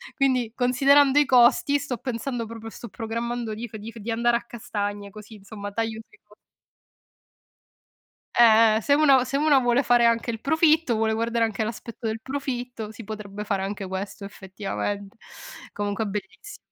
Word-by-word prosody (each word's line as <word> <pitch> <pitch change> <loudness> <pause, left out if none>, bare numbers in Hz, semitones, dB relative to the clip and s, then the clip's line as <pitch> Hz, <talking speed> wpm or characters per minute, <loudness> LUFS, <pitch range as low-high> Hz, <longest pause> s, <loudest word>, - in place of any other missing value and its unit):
quindi, 255 -5 +1
considerando 275 +3 +4
i 295 - +4
costi, 260 +3 +4
sto 260 -3 -4
pensando 240 0 -4
proprio 225 0 -8
sto 235 - -10
programmando 230 0 -4
di 235 +2 -6
f 215 - -9
di 220 +2 -8
f 230 - -14
di 225 +3 -5
andare 235 +1 +2
a - - -10
castagne, 205 -3 -5
così, 215 +2 -12
insomma, 205 0 -8
taglio 225 +1 -3
sui 425 - -23
co - - -22 2.0
Eh, 220 -2 +6
se 285 - +2
uno 275 -4 +5
se 275 +2 -1
uno 295 -2 +4
vuole 245 +2 +3
fare 240 -1 +4
anche 230 +1 +2
il 225 -1 -3
profitto, 315 -3 +3
vuole 220 0 +1
guardare 230 +1 0
anche 220 -1 -3
all'aspetto 230 +1 -7
del 220 0 -3
profitto, 250 -4 -5
si 220 +1 -10
potrebbe 210 -1 -7
fare 195 -2 -2
anche 195 -1 -4
questo, 195 +2 -6
effettivamente. 200 +1 -5 0.6
Comunque 205 +1 -2
è - - -3
bellissi 210 - -7
230 Hz, 170 wpm, -24 LUFS, 210-250 Hz, 2.0 s, Eh